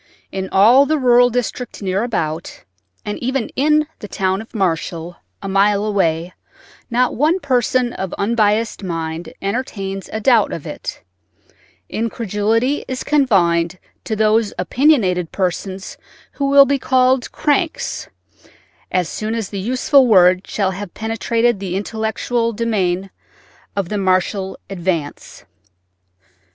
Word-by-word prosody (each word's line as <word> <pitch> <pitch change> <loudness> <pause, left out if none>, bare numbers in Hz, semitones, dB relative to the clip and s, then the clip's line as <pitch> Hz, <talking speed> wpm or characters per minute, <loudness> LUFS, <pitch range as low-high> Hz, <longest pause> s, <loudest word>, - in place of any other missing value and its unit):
In 190 0 -4
all 240 +8 +6
the 310 - +1
rural 245 -2 +5
district 245 0 -3
near 195 +1 -1
about, 165 -9 -3 0.4
and 210 - -4
even 255 -1 -2
in 300 +2 +3
the 210 - -7
town 190 0 -1
of 225 - -14
Marshall, 170 -2 -2 0.3
a - - -4
mile 200 +1 +2
away, 175 -4 0 0.6
not 250 +1 +1
one 315 +8 +2
person 250 -3 +1
of 190 -2 -4
unbiased 215 +1 +1
mind 165 -2 -4
entertains 195 -3 -3
a 220 - -3
doubt 230 0 +3
of - - -6
it; - - -7 0.8
incredulity 225 +3 -1
is 255 0 -4
confined 180 - +2 0.3
to 220 - -2
those 215 0 +2
opinionated 185 - +2
persons 190 +1 -3 0.3
who 275 -1 -2
will 280 0 +8
be 275 0 0
called 255 -1 +2
"cranks" 320 +2 -1 0.8
as 180 -2 +1
soon 220 +5 -3
as 225 -4 -3
the 200 - -5
useful 255 +5 +3
word 185 -3 +5
shall 195 -3 0
have 190 -1 -7
penetrated 225 0 0
the 185 -2 -4
intellectual 220 +3 -1
demesne 195 -4 -1 0.6
of 195 -3 -2
the 210 - -2
Marshall 190 +1 0
Advance. 170 -6 -4
210 Hz, 125 wpm, -19 LUFS, 190-245 Hz, 0.8 s, will